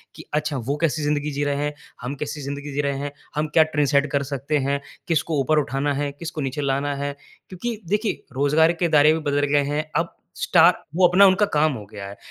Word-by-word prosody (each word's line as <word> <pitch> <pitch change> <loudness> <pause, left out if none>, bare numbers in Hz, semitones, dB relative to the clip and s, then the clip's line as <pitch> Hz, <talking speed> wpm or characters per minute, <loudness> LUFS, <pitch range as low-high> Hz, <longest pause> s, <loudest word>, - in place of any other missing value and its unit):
कि - - -11
अच्छा 150 -1 -1
वो 140 - +1
कैसी 155 -2 +1
ज़िंदगी 150 0 0
जी 145 +1 -2
रहे 145 0 0
हैं। 150 - -2 0.3
हम 125 +4 -4
कैसी 145 +1 -5
ज़िंदगी 140 +1 -5
जी 145 - 0
रहे 140 -1 -1
हैं। 145 0 -4 0.2
हम 150 +1 0
क्या 160 - +7
ट्रेंड 150 -2 0
सेट 145 0 +3
कर 140 -2 +1
सकते 140 +3 -1
हैं। 140 0 +1 0.3
किसको 160 -2 0
ऊपर 155 +4 +2
उठाना 135 0 -2
है। 145 0 -2
किसको 155 +1 -6
नीचे 135 +2 -3
लाना 140 +1 0
है। 140 0 -3 0.4
क्योंकि 225 +6 -4
देखिए 210 +2 -1
रोज़गार 150 +4 +4
के 175 - +2
दायरे 155 0 +6
भी 160 - -1
बदल 145 0 +2
गए 145 0 +4
हैं। 145 +2 -1
अब 165 0 0 0.2
स्टार 175 0 +5 0.2
वो 180 0 +6
अपना 185 +3 +6
उनका 195 +2 +5
काम 150 0 +3
हो 110 -5 -7
गया 100 -2 -7
है। 100 - -10
145 Hz, 230 wpm, -23 LUFS, 140-160 Hz, 0.4 s, क्या